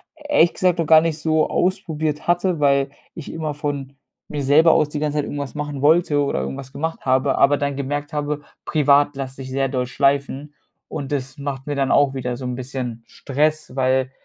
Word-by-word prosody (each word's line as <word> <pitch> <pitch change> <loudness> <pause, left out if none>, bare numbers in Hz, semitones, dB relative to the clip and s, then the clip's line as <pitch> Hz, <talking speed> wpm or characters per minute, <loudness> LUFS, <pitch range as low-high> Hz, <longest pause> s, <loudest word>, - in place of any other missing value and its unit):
ehrlich 295 - +2
gesagt 180 -1 +1
noch 165 - 0
gar 155 0 +7
nicht 165 -2 -1
so 155 0 +1
ausprobiert 160 -5 -1
hatte, 175 -1 +1
weil 140 -1 +2 0.2
ich 165 - -8
immer 155 -2 -3
von 140 -2 -4 0.3
mir 150 -2 -4
selber 155 +5 +6
aus 155 -2 +2
die 150 - -5
ganze 150 0 -1
Zeit 145 - -1
irgendwas 140 -1 -5
machen 145 -2 -4
wollte 155 0 +4
oder 140 - -1
irgendwas 70 - -6
gemacht 160 +3 -3
habe, 130 +1 +2
aber 145 +1 +4
dann 140 0 -2
gemerkt 145 +2 -3
habe, 150 -1 -2 0.2
privat 145 -1 +3
lasse 135 -1 -6
ich 130 - -8
sehr 135 0 0
doll 125 -1 -1
schleifen 140 +2 0 0.3
und 140 -2 -6
das 135 -1 -3
macht 140 -1 -5
mir 145 - -2
dann 135 -1 0
auch 140 -2 +4
wieder 125 -2 -3
so 130 - -7
'n 125 0 -3
bisschen 125 -2 -5
Stress, 150 0 -1
weil 130 0 +1
145 Hz, 200 wpm, -21 LUFS, 135-155 Hz, 0.3 s, gar